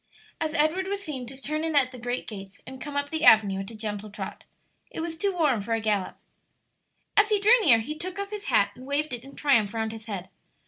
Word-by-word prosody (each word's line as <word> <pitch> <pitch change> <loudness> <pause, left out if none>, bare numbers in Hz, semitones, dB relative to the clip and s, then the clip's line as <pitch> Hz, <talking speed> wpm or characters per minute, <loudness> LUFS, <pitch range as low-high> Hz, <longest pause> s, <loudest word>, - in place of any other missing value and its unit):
as 315 0 -2
Edward 335 +5 +2
was 400 0 -3
seen 265 -7 -5
to 265 +2 -9
turn 305 +3 -2
in 325 -1 -1
at 260 -3 +4
the 250 - -10
great 245 +1 -3
gates 195 -3 -9
and 260 0 -10
come 290 -1 -5
up 285 0 -1
the 320 -1 -2
avenue 205 -3 +6
at 195 - -5
a 230 - -10
gentle 210 -1 -5
trot. 200 -1 -7 0.4
It - - -7
was 325 0 -3
too 395 +5 0
warm 300 - +1
for 225 +3 -2
a - - -1
gallop. 210 -4 -1 1.0
As 415 +1 +5
he 420 -1 +3
drew 450 +4 +6
near 255 - +7
he 300 +7 -5
took 365 +4 -5
off 400 0 -4
his 420 -1 -5
hat 200 0 +3
and 255 +4 -12
waved 285 0 0
it 240 -1 -5
in 275 +1 -13
triumph 230 -8 +2
round 220 -1 -1
his 225 0 -10
head. 190 -4 -5
265 Hz, 245 wpm, -26 LUFS, 220-320 Hz, 1.0 s, near